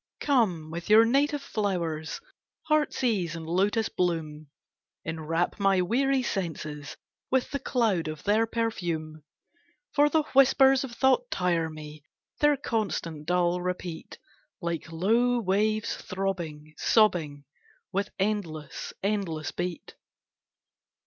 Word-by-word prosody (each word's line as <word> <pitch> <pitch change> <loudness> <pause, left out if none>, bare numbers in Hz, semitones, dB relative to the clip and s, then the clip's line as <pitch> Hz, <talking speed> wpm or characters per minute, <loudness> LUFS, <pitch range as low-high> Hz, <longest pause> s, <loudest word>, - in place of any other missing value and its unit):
Come 185 - +1
with 170 +3 -6
your 220 +2 +8
native 285 +4 +1
flowers, 170 - -2 0.4
Heartsease 240 - +1
and 165 -1 -6
lotus 200 +6 +1
bloom, 155 -4 -2 0.6
Enwrap 165 +4 -2
my 195 -1 +3
weary 260 +7 +1
senses 155 -8 -4 0.3
With 260 -1 +1
the 280 - -2
cloud 215 -13 +1
of 155 -1 -6
their 215 +2 +2
perfume; 170 -10 -3 0.7
For 295 0 +4
the 315 +1 +2
whispers 270 0 +6
of 265 - -6
thought 265 - +2
tire 170 - 0
me, 155 -1 -10 0.4
Their 295 -1 +4
constant, 170 - -3
dull 180 0 +2
repeat, 180 -2 -5 0.4
Like 170 -2 -4
low 230 +9 +2
waves 215 +1 +1
throbbing, 170 -6 -4
sobbing, 160 -10 +2 0.5
With 200 +1 -1
endless, 185 -8 -3
endless 195 -7 -1
beat. 175 -1 -5
185 Hz, 110 wpm, -27 LUFS, 160-230 Hz, 0.7 s, your